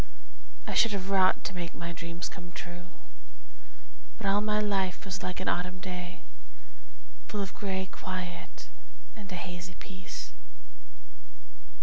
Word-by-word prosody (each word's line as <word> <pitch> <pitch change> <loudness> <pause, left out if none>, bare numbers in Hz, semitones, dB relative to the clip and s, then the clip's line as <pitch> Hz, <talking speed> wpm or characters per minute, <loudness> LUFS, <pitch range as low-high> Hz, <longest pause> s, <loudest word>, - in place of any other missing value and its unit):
I - - -1
should 230 -3 +7
have 195 -1 0
wrought 190 -1 +7
to - - -1
make 175 -2 -2
my 170 0 -2
dreams 170 0 -2
come 175 -1 -7
true, 175 +1 -5 1.3
But 225 - -4
all 200 +1 +6
my 210 0 +4
life 195 -3 +2
was 195 0 -1
like 180 -1 -1
an 185 - -1
autumn 180 +1 +2
day, 180 -1 -4 1.1
Full 210 - -1
of 195 - -4
gray 190 -2 0
quiet 185 -2 -4 0.5
and 210 -3 -8
a - - -1
hazy 175 0 -4
peace. 185 -1 -6
185 Hz, 135 wpm, -32 LUFS, 175-195 Hz, 1.3 s, should